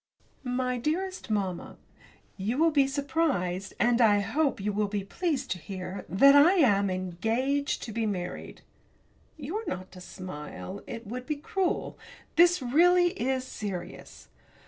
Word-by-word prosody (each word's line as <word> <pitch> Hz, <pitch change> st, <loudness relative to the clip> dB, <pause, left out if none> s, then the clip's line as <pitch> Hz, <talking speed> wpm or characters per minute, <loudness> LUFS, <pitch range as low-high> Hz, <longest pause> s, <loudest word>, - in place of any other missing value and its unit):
MY 250 Hz, 0 st, -1 dB
DEAREST 365 Hz, +7 st, -2 dB
MAMMA, 195 Hz, -5 st, -2 dB, 0.6 s
You 215 Hz, +6 st, -2 dB
will 325 Hz, +2 st, +4 dB
be 280 Hz, -3 st, +3 dB
surprised, 270 Hz, -, -1 dB
and 240 Hz, 0 st, +3 dB
I 210 Hz, -3 st, +5 dB
hope 285 Hz, +6 st, 0 dB
you 205 Hz, +1 st, -2 dB
will 210 Hz, 0 st, 0 dB
be 200 Hz, -1 st, -3 dB
pleased 280 Hz, -, -2 dB
to 180 Hz, -, -2 dB
hear 185 Hz, +1 st, -7 dB
that 275 Hz, +9 st, +6 dB
I 300 Hz, +6 st, +7 dB
am 205 Hz, -, +4 dB
engaged 225 Hz, -, -1 dB
to 230 Hz, -, -6 dB
be 225 Hz, 0 st, -1 dB
married! 180 Hz, -3 st, -5 dB, 0.8 s
You 310 Hz, +7 st, -4 dB
are 445 Hz, -, -5 dB
not 185 Hz, 0 st, -5 dB
to 180 Hz, -, -12 dB
smile 185 Hz, +1 st, -8 dB
it 230 Hz, 0 st, -7 dB
would 250 Hz, +4 st, -6 dB
be 305 Hz, -, -1 dB
cruel 360 Hz, +5 st, -2 dB, 0.4 s
this, 345 Hz, -3 st, +5 dB
really, 350 Hz, +7 st, +4 dB
is 265 Hz, -8 st, -1 dB
serious. 200 Hz, -7 st, -7 dB
245 Hz, 145 wpm, -28 LUFS, 195-295 Hz, 0.8 s, I